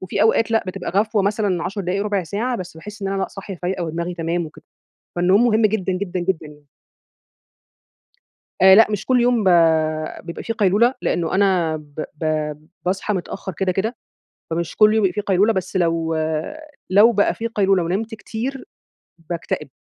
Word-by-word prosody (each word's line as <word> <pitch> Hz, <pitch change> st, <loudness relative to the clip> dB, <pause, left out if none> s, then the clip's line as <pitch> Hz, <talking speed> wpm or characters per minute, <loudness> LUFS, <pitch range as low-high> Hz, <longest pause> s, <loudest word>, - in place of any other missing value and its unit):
وفي 185 Hz, -, -1 dB
أوقات 225 Hz, 0 st, +3 dB
لأ 225 Hz, 0 st, +2 dB
بتبقى 185 Hz, 0 st, -4 dB
غفوة 210 Hz, +2 st, +1 dB
مثلًا 200 Hz, -3 st, 0 dB
10 200 Hz, +1 st, -3 dB
دقايق 190 Hz, +2 st, -1 dB
ربع 205 Hz, -2 st, 0 dB
ساعة 220 Hz, +9 st, -2 dB
بس 180 Hz, -5 st, -8 dB
باحس 210 Hz, +5 st, -10 dB
إن 195 Hz, -, -1 dB
أنا 195 Hz, 0 st, -1 dB
لأ -, -, -2 dB
صاحية 195 Hz, 0 st, -8 dB
فايقة 180 Hz, 0 st, -2 dB
ودماغي 170 Hz, +2 st, -3 dB
تمام 170 Hz, 0 st, -2 dB
وكده. 155 Hz, -, -15 dB, 0.5 s
فالنوم 185 Hz, +6 st, +4 dB
مهم 220 Hz, -1 st, +3 dB
جدًا، 195 Hz, -3 st, 0 dB
جدًا، 185 Hz, -1 st, -3 dB
جدًا. 165 Hz, -5 st, -3 dB, 2.1 s
آآ 190 Hz, 0 st, +9 dB
لأ، 225 Hz, +3 st, +7 dB
مش 210 Hz, -1 st, -3 dB
كل 255 Hz, -1 st, +3 dB
يوم 240 Hz, -2 st, +2 dB
ب -, -, +4 dB, 0.8 s
بيبقى 170 Hz, 0 st, -7 dB
في 230 Hz, -, -2 dB
قيلولة 220 Hz, +3 st, +3 dB
لأنه 170 Hz, -2 st, -1 dB
أنا 185 Hz, -5 st, +2 dB
ب 150 Hz, 0 st, -7 dB
ب 155 Hz, -, -7 dB, 0.6 s
باصحى 190 Hz, +3 st, -1 dB
متأخر 190 Hz, +1 st, -5 dB
كده، 185 Hz, +2 st, -1 dB
كده، 220 Hz, +6 st, -2 dB, 0.5 s
فمش 165 Hz, +1 st, -3 dB
كل 215 Hz, 0 st, +5 dB
يوم 220 Hz, -1 st, +2 dB
بيبقى 190 Hz, -, +2 dB
في 210 Hz, -, -2 dB
قيلولة 200 Hz, +2 st, +2 dB
بس 190 Hz, -1 st, -4 dB
لو 165 Hz, -2 st, 0 dB, 0.7 s
لو 205 Hz, +5 st, +6 dB
بقى 205 Hz, -3 st, +2 dB
في 230 Hz, -, -3 dB
قيلولة 195 Hz, -5 st, +2 dB
ونمت 210 Hz, +7 st, -2 dB
كتير 245 Hz, +6 st, -5 dB, 0.6 s
باكتئب، 165 Hz, -3 st, -3 dB
195 Hz, 175 wpm, -21 LUFS, 175-215 Hz, 2.1 s, آآ